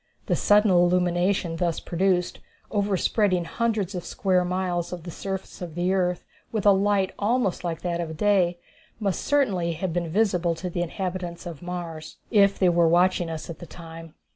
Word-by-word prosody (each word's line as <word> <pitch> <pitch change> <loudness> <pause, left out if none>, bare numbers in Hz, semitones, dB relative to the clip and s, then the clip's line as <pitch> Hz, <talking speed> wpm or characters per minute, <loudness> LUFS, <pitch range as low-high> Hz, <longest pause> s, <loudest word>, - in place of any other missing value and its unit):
The - - +1
sudden 210 0 +4
illumination 175 0 +2
thus 170 -1 0
produced, 180 0 0 0.3
overspreading 200 -2 +1
hundreds 215 -1 -1
of 180 -2 -4
square 185 -2 +1
miles 180 -1 -2
of 175 -2 -6
the 175 - -7
surface 190 +2 -6
of 170 -3 -6
the 180 +2 +1
earth 180 -2 0 0.3
with 215 -3 -2
a 205 - +8
light 195 -1 +2
almost 210 -3 0
like 170 -2 -3
that 175 -1 -1
of 160 -2 -5
day, 185 -3 +2 0.4
must 195 -5 -1
certainly 195 -13 +1
have 170 +1 -3
been 170 -1 -1
visible 180 -3 +1
to 180 +2 -5
the 175 - -2
inhabitants 180 -1 -4
of 170 -4 -7
Mars, 170 -3 -6
if 200 -2 +4
they 185 - +4
were 170 -1 +4
watching 175 0 +3
us 160 -1 -5
at 165 - -8
the 175 - -9
time. 165 -1 -11
180 Hz, 175 wpm, -25 LUFS, 170-195 Hz, 0.4 s, a